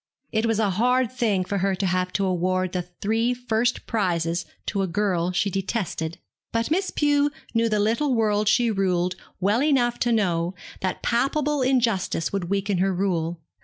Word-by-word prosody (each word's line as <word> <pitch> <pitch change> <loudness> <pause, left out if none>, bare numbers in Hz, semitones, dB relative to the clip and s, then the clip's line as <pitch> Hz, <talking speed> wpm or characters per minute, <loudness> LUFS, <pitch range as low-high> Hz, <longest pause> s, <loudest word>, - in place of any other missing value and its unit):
It 220 0 +1
was 225 -2 +1
a 215 -3 +2
hard 250 +5 +2
thing 220 -7 0
for 200 +1 -2
her 195 +1 +1
to 195 - -2
have 180 0 0
to 200 - +1
award 185 0 0
the 180 - -1
three 220 +7 -1
first 240 -1 0
prizes 170 -5 -1 0.2
to 200 - -1
a 190 - 0
girl 180 -1 0
she 195 +2 0
detested; 185 -4 -2 0.3
but 230 +5 -1
Miss 375 +4 +1
Pew 290 -1 +2 0.2
knew 230 0 +2
the 215 - +1
little 235 +6 +1
world 215 -2 +1
she 235 0 +3
ruled 185 -3 0 0.2
well 205 +6 +2
enough 245 -5 +2
to 240 - +1
know 180 -5 +1 0.2
that 185 - -3
palpable 280 +4 +1
injustice 235 -10 +1
would 195 -3 -1
weaken 200 -1 0
her 195 +1 +2
rule. 175 -3 -1
205 Hz, 175 wpm, -24 LUFS, 185-235 Hz, 0.3 s, she